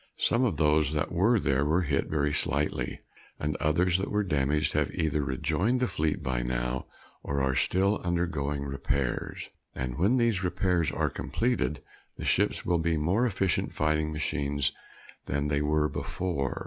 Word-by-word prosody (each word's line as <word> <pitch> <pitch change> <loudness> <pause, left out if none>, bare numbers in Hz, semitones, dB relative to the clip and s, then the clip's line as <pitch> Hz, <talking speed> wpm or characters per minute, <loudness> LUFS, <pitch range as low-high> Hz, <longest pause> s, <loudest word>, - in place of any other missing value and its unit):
Some 120 +3 +2
of 100 -11 0
those 75 -1 +3
that 75 - -1
were 105 +7 +3
there 70 -5 +1
were 80 +5 +2
hit 70 -3 0
very 75 -1 0
slightly, 75 +1 -1 0.4
and 75 0 -1
others 85 +3 +2
that 95 - -2
were 105 0 +1
damaged 75 -3 +1
have - - +1
either 75 -2 0
rejoined 80 - 0
the 125 - +1
fleet 75 -5 -1
by 65 -3 -1
now 60 +1 -2 0.3
or 70 0 -2
are 65 -1 +1
still 95 +10 +1
undergoing 80 -5 -1
repairs. 70 -2 -2 0.3
And 65 +1 -4
when 105 +9 +3
those 115 -6 +2
repairs 90 -3 +1
are - - 0
completed, 120 - -1 0.3
the - - -5
ships - - +1
will 85 -1 +2
be 80 0 +1
more 95 +11 +2
efficient 95 -5 0
fighting 75 0 +1
machines 70 -2 -1 0.6
than 70 +2 -1
they 75 -1 +1
were 75 +1 +2
before. 75 -5 -3
75 Hz, 160 wpm, -28 LUFS, 70-90 Hz, 0.6 s, those